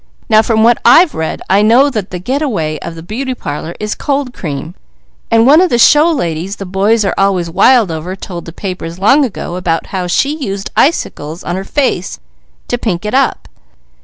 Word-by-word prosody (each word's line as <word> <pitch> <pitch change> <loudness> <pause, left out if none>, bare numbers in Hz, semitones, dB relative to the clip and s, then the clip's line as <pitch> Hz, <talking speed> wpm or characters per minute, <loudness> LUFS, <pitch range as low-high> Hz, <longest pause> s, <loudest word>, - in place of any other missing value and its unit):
Now 215 0 +6
from 220 -1 +1
what 235 +1 +4
I've 305 +7 +6
read, 160 0 -4
I 195 +2 +3
know 245 +7 +4
that 215 -6 -4
the 180 - -5
get 255 +11 -2
a 300 - 0
way 155 - -3
of 170 +3 -7
the 165 - -10
beauty 255 +8 -4
parlours 155 -2 -6
is 210 0 -3
cold 280 -3 -2
cream. 155 - -6 0.6
And 225 0 +4
one 295 +6 +6
of 370 - +2
the 240 - +1
show 300 +7 +5
ladies 175 - -3
the 195 - -7
boys 200 +4 +1
are - - 0
always 185 -4 +1
wild 230 +1 +4
over 165 +4 -5
told 175 -3 -8
the 165 - -8
papers 180 -2 -6
long 270 +10 +4
ago 185 -7 -4
'bout 165 -2 -1
how 185 -2 -2
she 280 - +1
used 200 -9 -5
icicles 165 - -1
on 175 - -3
her 190 - -4
face 225 -6 -2 0.5
to 245 - -2
pink 195 -5 -2
it 210 - -3
up. 265 -1 0
200 Hz, 205 wpm, -13 LUFS, 175-255 Hz, 0.6 s, Now